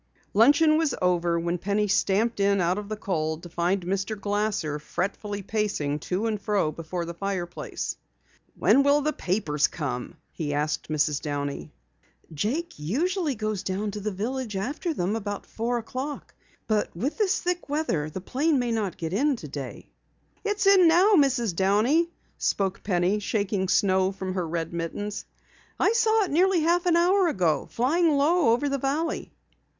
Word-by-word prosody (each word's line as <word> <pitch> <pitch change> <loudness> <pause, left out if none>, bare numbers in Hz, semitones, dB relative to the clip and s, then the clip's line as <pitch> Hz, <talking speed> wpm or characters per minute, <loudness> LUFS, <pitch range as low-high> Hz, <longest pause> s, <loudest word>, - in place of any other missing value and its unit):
Luncheon 290 +8 +5
was 320 -4 +1
over 175 -2 +1
when 170 +1 -2
Penny 205 +3 0
stamped 205 +3 +1
in 200 0 +3
out 180 +2 +1
of 205 0 -8
the 215 - -3
cold 160 -5 -2
to 175 - -9
find 175 +3 0
Mr. 195 +3 -2
Glasser 205 -7 -1
fretfully 200 +5 -4
pacing 200 -9 -1
to 185 +7 -2
and 215 -3 -1
fro 200 -6 +1
before 170 +2 -5
the 170 - -6
fireplace. 175 -1 -4 0.6
"When 275 - +5
will 285 +1 +4
the 305 +1 0
papers 165 - 0
come?" 130 -6 -4 0.2
he 145 -3 -3
asked 150 +2 -2
Mrs. 150 -1 +1
Downey. 145 -1 -4 0.6
"Jake 240 - -2
usually 305 - 0
goes 215 -2 -2
down 200 +2 -2
to 210 - -5
the 210 +1 -2
village 220 +3 -3
after 280 - -2
them 200 - -1
about 205 -2 -4
four 235 +2 -2
o'clock. 260 +5 -5 0.3
But 215 -2 +1
with 275 - -2
this 405 -3 +2
thick 355 -3 -2
weather, 230 - -1
the 185 +4 -6
plane 285 - +1
may 245 -2 0
not 215 -5 -2
get 165 0 -4
in 280 +7 +2
today." 145 - -8 0.5
"It's 415 -1 -1
in 390 -3 +7
now, 360 +6 +5
Mrs. 255 - +3
Downey," 220 - +3 0.3
spoke 195 -1 0
Penny, 185 +1 +1
shaking 200 -2 -1
snow 190 0 +3
from 190 -1 -5
her 180 -3 -2
red 165 0 -3
mittens. 185 +5 -4 0.5
"I - - +3
saw 445 -2 +3
it 385 - -4
nearly 360 +3 +3
half 345 +2 +2
an 340 - +4
hour 360 +2 +4
ago, 180 - +1
flying 305 +5 +2
low 310 0 +3
over 285 +5 0
the 275 0 -1
valley." 290 +5 -2
205 Hz, 165 wpm, -26 LUFS, 175-285 Hz, 0.6 s, in